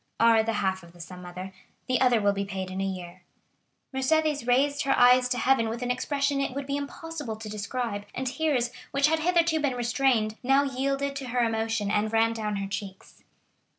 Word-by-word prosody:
"Are 230 -1 +6
the 225 +1 -1
half 190 -2 -1
of 170 -1 -16
the 175 - -18
sum, 180 +2 -9
mother; 180 +2 -8 0.3
the 255 -1 +1
other 250 -3 +4
will 205 -1 +2
be 200 0 -2
paid 190 -1 -5
in 190 +1 -3
a - - 0
year." 185 -2 -5 0.7
Mercédès 290 0 +1
raised 285 +4 +2
her 275 -2 +1
eyes 250 0 +6
to 250 - 0
heaven 245 -4 +2
with 235 +2 -4
an 245 - 0
expression 280 +2 0
it 270 -2 -2
would 280 0 -3
be 280 +1 -2
impossible 285 -3 -5
to 220 0 -9
describe, 210 0 -4
and 260 - -3
tears, 255 -3 0 0.2
which 275 0 +2
had 320 0 +2
hitherto 335 -1 +2
been 285 -4 0
restrained, 240 -3 +1
now 270 +2 +3
yielded 275 +1 -1
to 270 -2 -6
her 245 0 0
emotion, 225 -2 -1
and 215 +1 +1
ran 225 0 +3
down 215 -2 -3
her 195 0 -3
cheeks. 195 -1 -8
245 Hz, 205 wpm, -27 LUFS, 205-275 Hz, 0.7 s, Are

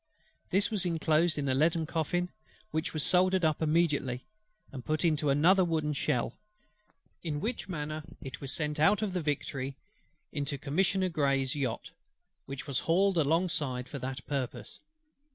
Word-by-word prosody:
This 195 +4 +2
was 205 -4 +1
inclosed 165 -1 +2
in 140 -1 -1
a 130 - +2
leaden 160 +4 +2
coffin; 175 +3 -1 0.4
which 160 +2 -1
was 155 -3 -1
soldered 185 0 +3
up 155 -1 +1
immediately, 150 -6 +1 0.5
and 130 -3 -7
put 155 +5 0
into 155 -2 +2
another 170 +7 +5
wooden 160 -3 0
shell: 125 -3 0 0.9
in 150 -3 -2
which 230 +3 -3
manner 155 -2 -3 0.2
it 135 - -8
was 135 -2 -4
sent 150 -1 -2
out 205 +7 +4
of 200 -3 -1
the 180 - 0
Victory 140 -2 -2 0.5
into 145 -1 -2
Commissioner 185 +7 +1
GREY'S 140 -4 +1
yacht, 130 -6 -3 0.6
which 135 +1 -6
was 140 -4 0
hauled 190 +3 +2
alongside 150 -5 +1
for 140 - -6
that 130 0 -5
purpose. 125 -5 -4
155 Hz, 155 wpm, -30 LUFS, 140-175 Hz, 0.9 s, another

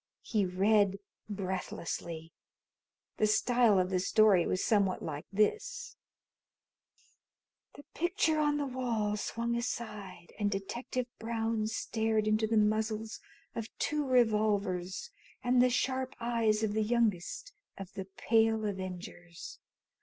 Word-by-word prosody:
He 210 -4 +1
read 200 +2 +3 0.3
breathlessly. 180 -4 -4 0.8
The 215 - +3
style 235 0 +4
of 185 0 +1
the 185 - +2
story 195 -1 +4
was 185 - 0
somewhat 200 -4 +2
like 150 -2 -5
this: 445 - 0 1.8
The 285 - -11
picture 345 -2 +1
on 295 -1 +2
the 290 - -1
wall 235 -5 -1
swung 235 +3 -2
aside 210 -7 -5
and 205 -1 +2
Detective 235 +6 -3
Brown 225 -1 -1
stared 220 -1 0
into 215 +1 +2
the 225 0 +1
muzzles 215 +1 0 0.3
of 225 -1 -4
two 300 0 0
revolvers 210 - +1 0.3
and 245 0 +4
the 250 - +5
sharp 260 +1 -1
eyes 230 -2 +1
of 210 -2 0
the 220 - +1
youngest 230 - 0 0.2
of 195 -1 -8
the 190 - -5
Pale 220 +2 +2
Avengers. 180 -3 -6
215 Hz, 120 wpm, -31 LUFS, 195-235 Hz, 1.8 s, the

